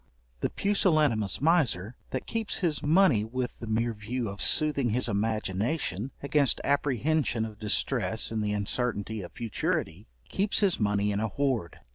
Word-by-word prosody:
The - - -1
pusillanimous 155 - +2
miser, 130 - +2
that 130 - -4
keeps 225 -3 -2
his 165 -5 0
money 155 - +4
with 125 +3 -4
the 115 - -7
mere 115 +2 0
view 110 +2 -4
of 100 +1 -7
soothing 145 -5 +2
his 125 +4 +1
imagination 110 - -1
against 140 -1 +2
apprehension 140 -3 +1
of 110 -2 -9
distress 110 -1 +1
in 110 -1 -1
the 105 -1 -1
uncertainty 105 0 -2
of 90 - -9
futurity, 115 -2 -3 0.2
keeps 200 +2 +2
his 195 -4 +2
money 105 -1 +1
in 100 - -1
a 110 - 0
hoard. 120 - -2
120 Hz, 150 wpm, -28 LUFS, 105-145 Hz, 0.2 s, money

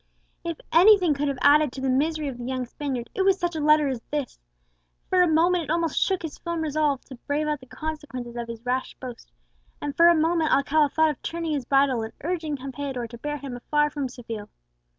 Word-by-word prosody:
If 335 -2 -4
anything 360 -1 +6
could 290 +1 -1
have 280 -2 -1
added 295 -1 +5
to 265 - -6
the 265 - -1
misery 300 +4 +1
of 255 -3 -6
the - - -6
young 255 0 -2
Spaniard, 250 -2 -5
it - - -1
was 385 0 +4
such 345 -1 -1
a - - -2
letter 300 0 +4
as 260 -4 -3
this. 290 -4 -3 0.7
For 370 - +5
a 360 - +5
moment 335 +2 +3
it - - -13
almost 335 -2 +1
shook 380 -3 +1
his 315 -3 -6
firm 340 -1 -3
resolution 295 -3 0
to 265 - -8
brave 295 +1 0
out 300 -1 -1
the 255 - -15
consequences 280 -6 -6
of 235 -1 -4
his 230 0 -8
rash 255 +1 -1
boast; 245 - -10 0.6
for 335 - +6
a 345 - +6
moment 325 0 +2
Alcala 290 +1 +3
thought 315 +2 +3
of 290 - -10
turning 335 -1 -3
his 280 -4 -2
bridle 270 -2 +3
and 220 0 -6
urging 320 -3 -2
Campeador 265 -2 -5
to 235 - -9
bear 295 +3 -3
him 275 -3 -7
afar 295 +4 +1
from 280 -3 -3
Seville! 230 -4 -7
295 Hz, 220 wpm, -25 LUFS, 260-320 Hz, 0.7 s, anything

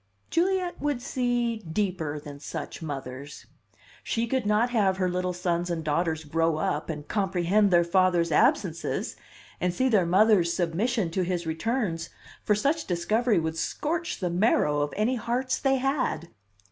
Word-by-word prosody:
"Juliet 360 +1 0
would 290 -4 0
see 245 -2 0
deeper 175 -5 -2
than 145 -1 -10
such 145 - -6
mothers. 140 -2 -7 0.6
She 230 0 -1
could 250 -2 -1
not 215 +4 +2
have 200 -5 +2
her 185 -1 +1
little 180 0 -1
sons 175 -1 -1
and 165 -2 -2
daughters 160 +1 0
grow 165 +1 +1
up 150 0 -1
and 150 -2 -5
comprehend 195 0 +2
their 175 -2 +5
father's 175 -1 +2
absences, 165 +2 +1 0.4
and 180 - +1
see 260 +9 +1
their 200 -7 +3
mother's 190 -1 +4
submission 185 +3 0
to 185 - 0
his 175 -1 -1
returns 165 +1 -2 0.3
for 210 - +3
such 290 +9 0
discovery 215 +6 +1
would 160 0 -1
scorch 335 - -2
the 180 -2 -1
marrow 170 -6 +2
of 145 0 -1
any 235 +5 +1
hearts 250 +3 -1
they 270 -1 +2
had." 265 - -1
185 Hz, 155 wpm, -27 LUFS, 165-235 Hz, 0.6 s, their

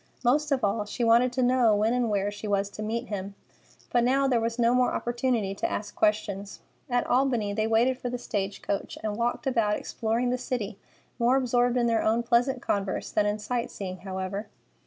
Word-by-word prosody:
Most 295 +5 +2
of 270 -2 +1
all, 210 +1 +1
she 240 +3 -3
wanted 235 +2 +5
to 255 0 +1
know 245 -3 +4
when 215 +3 +2
and 245 -2 +1
where 205 -1 0
she 205 +1 -7
was 200 0 0
to 215 - -8
meet 230 +3 -3
him. 200 -1 -5 0.6
But 240 -1 +3
now 270 +3 +3
there 245 -3 +2
was 230 +1 -2
no 235 0 +3
more 250 0 +2
opportunity 240 -4 -1
to 195 - -2
ask 205 0 -4
questions. 205 -2 0 0.3
At 245 -1 +1
Albany, 245 -5 +1
they 215 +1 0
waited 240 +3 +2
for 245 - -3
the 245 - -3
stage 200 -4 -3
coach, 200 - -3
and 215 -1 -2
walked 235 +5 -1
about 230 -5 +2
exploring 235 +2 -1
the 250 - -1
city, 230 -6 -4 0.4
more 240 +2 +4
absorbed 245 -1 +2
in 240 - +2
their 230 -1 +2
own 225 +2 +2
pleasant 245 +2 +1
converse 200 -1 -2
than 210 -1 +2
in 205 +1 0
sight 240 +3 -2
seeing, 185 -2 -6
however. 190 +2 -5
230 Hz, 205 wpm, -27 LUFS, 205-245 Hz, 0.6 s, wanted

